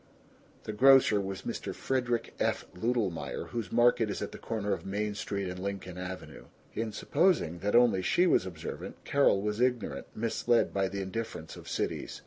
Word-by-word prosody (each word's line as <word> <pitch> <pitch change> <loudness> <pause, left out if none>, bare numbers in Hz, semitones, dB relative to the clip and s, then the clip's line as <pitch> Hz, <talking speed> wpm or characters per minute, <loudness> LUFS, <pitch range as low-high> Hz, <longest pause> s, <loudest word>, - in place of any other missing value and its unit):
(The 110 - -5
grocer 130 -3 +6
was 95 0 -5
Mr. - - -4
Frederick 120 -3 -1
F. - - 0
Ludelmeyer, 110 -3 -2
whose 115 -6 -4
market 120 -2 +4
is 100 - -3
at - - -4
the - - -9
corner 105 -3 -2
of - - -4
Main 105 +2 -2
Street 100 -1 -3
and 90 0 -5
Lincoln 95 -2 -5
Avenue. 90 0 -7 0.3
In 110 -1 -2
supposing 105 - +1
that 105 +4 0
only 120 -6 +5
she 175 - +3
was 95 - +3
observant 85 -4 -6
Carol 140 -8 +3
was 105 +2 -1
ignorant, 125 -1 0
misled 115 +1 +1
by 95 -1 +1
the 100 +1 -4
indifference 95 -5 -5
of - - -10
cities. - - -3
105 Hz, 170 wpm, -30 LUFS, 95-120 Hz, 0.3 s, grocer